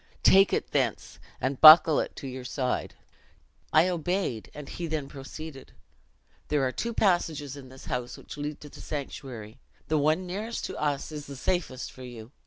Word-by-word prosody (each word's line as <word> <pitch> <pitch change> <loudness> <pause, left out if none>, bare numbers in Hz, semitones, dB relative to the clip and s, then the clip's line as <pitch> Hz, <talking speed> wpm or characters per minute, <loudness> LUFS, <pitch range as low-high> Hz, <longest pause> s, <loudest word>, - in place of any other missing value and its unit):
Take 195 +1 +6
it - - -1
thence, - - -1 0.2
and 130 0 -2
buckle 155 0 +10
it - - -3
to 135 - -7
your 130 0 -6
side." 125 0 -2 0.8
"I 160 +3 +5
obeyed, 175 - -2
and 150 -2 -9
he 170 - -5
then 155 -3 -3
proceeded: 140 +1 -9 0.7
'There 145 -3 +1
are - - -2
two 235 - -3
passages 165 - +1
in 135 -2 -11
this 130 0 -13
house 125 -2 -4
which - - -10
lead 150 0 -5
to 150 - -10
the - - -12
sanctuary. 130 -7 -7 0.3
The 155 -1 +2
one 155 +5 +2
nearest 210 +6 -4
to - - -6
us 145 0 -1
is 150 -2 -7
the 140 - -8
safest 135 -3 -2
for 130 - -14
you. 120 -2 -9
145 Hz, 180 wpm, -28 LUFS, 130-160 Hz, 0.8 s, buckle